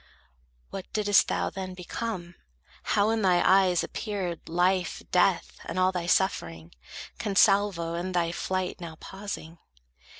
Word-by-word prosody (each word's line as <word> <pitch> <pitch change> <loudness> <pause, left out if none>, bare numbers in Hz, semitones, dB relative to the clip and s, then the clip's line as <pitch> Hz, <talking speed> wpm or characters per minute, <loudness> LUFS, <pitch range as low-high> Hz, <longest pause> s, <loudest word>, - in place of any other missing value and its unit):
What 190 - -7
didst 205 -1 +4
thou - - -1
then 185 -1 -6
become? 180 -1 -5 0.5
How 205 +2 +2
in 225 -1 0
thy 180 -3 +4
eyes 185 -2 +4
Appeared 190 -7 -4
life, 180 +1 +1
death, 180 0 +2
and 165 - -5
all 185 0 +3
thy 175 -2 -3
suffering, 85 - 0 0.5
Consalvo, 195 -4 +3
in 175 +2 -3
thy 170 -2 +1
flight 185 +1 -3
now 165 -2 -7
pausing? 190 -4 -7
185 Hz, 130 wpm, -27 LUFS, 175-195 Hz, 0.5 s, didst